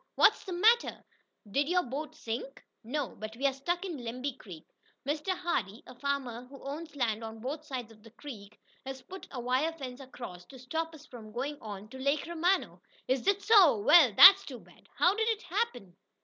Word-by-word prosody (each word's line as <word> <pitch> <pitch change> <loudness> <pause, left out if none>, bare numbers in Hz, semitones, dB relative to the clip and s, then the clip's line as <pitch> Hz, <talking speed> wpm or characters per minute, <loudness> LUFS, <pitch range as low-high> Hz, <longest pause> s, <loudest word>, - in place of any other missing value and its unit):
What's - - +5
the 375 - -5
matter, 450 +7 +3 0.5
did 285 +6 +1
your 360 0 +3
boat 280 +5 -6
sink?" 240 +4 -6 0.2
"No, 270 +4 -2
but 215 +1 -8
we're 270 +2 +1
stuck 345 +7 -2
in 320 -9 -6
Lemby 250 +4 -3
Creek. 185 -10 -12 0.4
Mr. 300 +5 -2
Hardee, 240 - -2
a - - -11
farmer 250 -2 -3
who 275 +1 -13
owns 300 +3 -7
land 230 -4 -1
on 225 0 -7
both 280 +7 -5
sides 255 -6 -6
of 215 -1 -18
the 225 - -15
creek, 215 -5 -11 0.2
has 265 -1 -7
put 380 +1 -10
a 255 - -6
wire 255 +6 +1
fence 260 -5 -8
across 240 -9 -9
to 260 - -13
stop 320 +6 -4
us 300 -1 -14
from 225 -6 -11
going 280 +6 -4
on 205 -2 -8
to 260 - -10
Lake 280 +2 0
Romano." 340 +3 0 0.3
"Is 260 0 +1
that 400 0 +2
so! 390 - +6
Well, 260 +5 +6
that's 390 +2 +11
too 260 - -8
bad. - - -21
How 360 - +4
did 445 +1 +1
it 450 -1 -1
happen?" 250 - -3
270 Hz, 195 wpm, -30 LUFS, 240-330 Hz, 0.5 s, that's